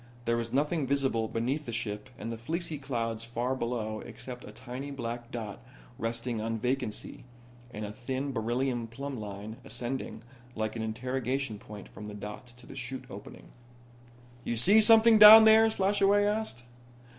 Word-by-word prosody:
There 115 0 +2
was 115 -1 -3
nothing 145 +2 0
visible 135 -5 0
between 120 +7 -1
the 120 - -6
ship 105 -1 -4
and 115 - -5
the 115 - -5
fleecy 160 +5 -3
clouds 115 -5 -3
far 120 +3 -2
below 115 -3 -3
except 125 +2 -9
a - - -10
tiny 130 +3 -7
black 120 -3 -5
dot 110 -2 -6 0.4
resting 115 0 -3
on 115 +1 -2
vacancy 125 -1 -3 0.5
and 105 -3 -6
a 105 - -6
thin 130 +4 -4
beryllium 120 0 -1
plumb 135 +2 -6
line 105 +1 -7
ascending 120 -2 -5 0.3
like 110 0 -2
an 115 - -3
interrogation 125 +1 -3
point 105 -1 -10
from 105 - -10
the 105 - -7
dot 105 +4 -8
to 120 - -15
the - - -11
'chute 130 0 -5
opening. - - -11 0.9
"You 120 - -2
see 200 - +6
something 225 0 +7
down 215 +1 +12
there?" 220 0 +7
Slashaway 200 0 +3
asked. 210 - -2
120 Hz, 160 wpm, -29 LUFS, 115-140 Hz, 0.9 s, down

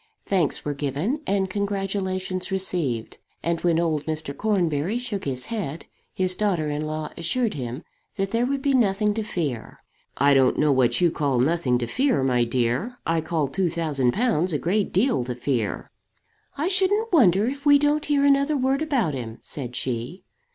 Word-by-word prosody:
Thanks 180 -7 0
were 145 - -1
given 145 - -2
and 195 -1 +1
congratulations 190 -2 -2
received; 170 -12 -1 0.2
and 170 0 -1
when 170 -2 +2
old 160 -3 -1
Mr. 155 -2 -3
Cornbury 185 -2 0
shook 235 -5 -4
his 130 -2 -3
head, 170 -8 -4 0.3
his 185 -1 0
daughter 180 -8 0
in 150 +1 -3
law 155 0 -4
assured 225 +7 0
him 125 +2 -5 0.3
that 195 -1 -2
there 235 +2 +1
would 275 0 -2
be 280 -2 +2
nothing 210 -4 +2
to 220 - -2
fear. 155 - -4 0.4
"I 140 0 +4
don't 130 -2 +4
know 150 -1 +3
what 130 +3 +2
you 175 -2 +4
call 140 -5 0
nothing 135 -2 +2
to 120 - -2
fear, 255 - +1
my 125 -2 +2
dear. 125 - -1
I 165 0 +1
call 160 -2 -1
two 180 +5 0
thousand 150 -7 0
pounds 195 -7 +1
a - - +2
great 195 +7 0
deal 220 - +2
to 125 0 -4
fear." 120 -4 -2 0.7
"I 300 +4 0
shouldn't 390 +3 +1
wonder 205 - +5
if 280 +4 -3
we 285 0 +8
don't 295 +1 +1
hear 285 -1 +2
another 280 +1 +3
word 265 +2 +1
about 265 - 0
him," 115 -4 -6
said 125 -4 -6
she. 125 +10 -3
175 Hz, 180 wpm, -24 LUFS, 140-225 Hz, 0.7 s, we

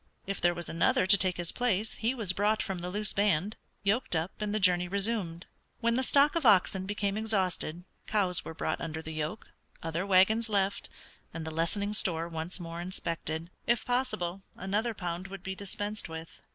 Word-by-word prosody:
If 195 -1 -3
there 175 0 +3
was 175 -1 -4
another 165 +2 +2
to 195 +2 +8
take 185 -2 +2
his 175 -1 -1
place 225 -3 0
he 230 +4 -1
was 210 -7 +1
brought 210 +3 +2
from 190 -2 -3
the 175 +1 -4
loose 210 +2 -1
band, 200 0 +1 0.3
yoked 205 0 +1
up 160 +3 0
and 210 -1 -1
the 215 - 0
journey 180 -2 +4
resumed. 195 -3 -1 0.3
When 235 0 +2
the 255 - +2
stock 280 +4 +4
of 335 - +1
oxen 190 -4 +4
became 205 0 -1
exhausted, 185 -6 0 0.2
cows 190 -5 +1
were 160 - -7
brought - - -2
under 160 0 -4
the 160 - -5
yoke, 155 +7 -4 0.3
other 165 +2 -1
wagons 200 +4 +4
left, 200 -1 0 0.5
and 165 -1 -4
the 160 - -4
lessening 200 +6 0
store 170 -5 +2
once 165 +2 -3
more 170 0 -6
inspected; 170 -2 -4 0.2
if 235 0 +2
possible 245 -8 -1
another 210 +5 -1
pound 180 0 -4
would 195 -1 -9
be 190 - -3
dispensed 205 +1 -3
with. 160 0 -8
190 Hz, 190 wpm, -30 LUFS, 170-210 Hz, 0.5 s, to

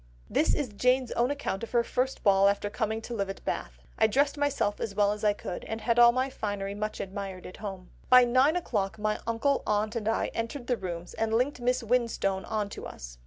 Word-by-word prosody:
This 310 - +3
is 285 -5 -2
Jane's 250 +4 +1
own 240 +2 +1
account 285 -9 -3
of 230 - -5
her 235 -1 +4
first 255 +3 -2
ball 195 -1 +5
after 205 0 -1
coming 220 0 -2
to 240 - -6
live 200 -4 -2
at 195 - -7
Bath: - - -3 0.2
"I 220 - +6
dressed 280 +7 +2
myself 285 -8 0
as 200 -3 -4
well 205 0 +3
as 210 +1 -5
I 210 -1 +4
could, 180 -3 -6
and 220 - -4
had 235 +1 +2
all 240 0 +9
my 255 +2 0
finery 205 -6 -4
much 215 +1 -4
admired 195 -1 -6
at 185 - -9
home. 195 -3 -7 0.2
By 255 0 +9
nine 260 +6 +4
o'clock 210 - -1
my 215 0 -1
uncle, 260 +5 +1
aunt, 215 +2 0
and 220 -2 -2
I 225 - 0
entered 230 +3 -4
the 245 -1 0
Rooms, 175 -3 -6
and 225 0 0
linked 255 +4 +1
Miss 250 0 +1
Winstone 225 -5 0
on 215 -2 -1
to - - -7
us. - - -10
220 Hz, 225 wpm, -28 LUFS, 200-250 Hz, 0.2 s, all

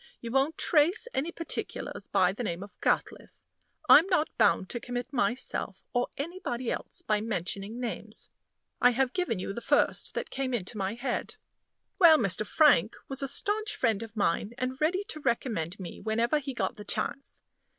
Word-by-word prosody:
You 235 - -6
won't 270 +5 +1
trace 345 +9 +3
any 300 +6 -1
particulars 335 -1 -5
by 190 -3 +3
the 210 - -6
name 175 -3 -3
of 200 - -14
Gatliffe. - - -1 0.5
I'm 330 - +8
not 360 -5 +1
bound 190 - +3
to 240 - -3
commit 245 +2 -5
myself 240 -6 -1
or 245 0 +1
anybody 280 -6 -3
else - - -5
by 210 -1 +1
mentioning 205 +1 -3
names. 240 -2 -6 0.5
I 245 0 +6
have 260 +1 +1
given 360 - -1
you 185 +2 -4
the 235 - -6
first - - +1
that - - -3
came 260 -2 -1
into 210 0 -4
my 195 +1 -2
head. 245 +1 -3 0.6
Well, 335 -4 +8
Mr. 215 - 0
Frank 260 - +4
was 270 0 -2
a 275 - -1
stanch 420 +10 0
friend 220 -2 +1
of 225 -1 -8
mine, 205 +1 0
and 255 +2 -3
ready 360 +6 +2
to 355 -7 -7
recommend 225 - -1
me 180 -3 -8
whenever 230 +6 +1
he 270 -2 -6
got 190 -5 -2
the 210 - -8
chance. 275 +6 -3
245 Hz, 175 wpm, -29 LUFS, 210-290 Hz, 0.6 s, I'm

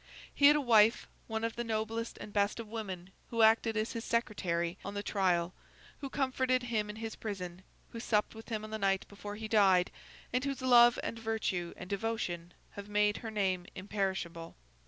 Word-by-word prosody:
He 285 - +6
had 295 - +7
a 295 - +2
wife, 225 -3 +5 0.2
one 220 0 -3
of 230 0 -1
the 240 - -2
noblest 225 0 -3
and 210 - -9
best 205 +2 +1
of 230 - -6
women, 195 -5 -6 0.2
who 230 -1 +2
acted 220 0 +4
as 215 +1 -1
his 230 - -4
secretary 180 -7 -1
on 200 +1 -6
his 205 - -3
trial, 180 -4 +1 0.5
who 275 - -5
comforted 260 -2 +1
him 220 -3 -1
in 210 - -6
his 225 0 -5
prison, 185 -4 -6 0.3
who 230 - -6
supped 210 -2 +1
with 225 +1 -11
him 215 -2 -3
on 215 - -8
the 220 - -3
night 195 -1 +1
before 205 0 -8
he 220 +1 -5
died, 195 -5 +4 0.4
and 250 0 +1
whose 275 -2 -3
love 240 -2 +7
and 230 - -4
virtue 215 -6 -2
and 180 - -8
devotion 190 -4 -3 0.2
have 200 0 -9
made 210 0 +2
her 225 - -6
name 190 -4 -1
imperishable. 190 -4 -3
215 Hz, 195 wpm, -32 LUFS, 195-230 Hz, 0.5 s, had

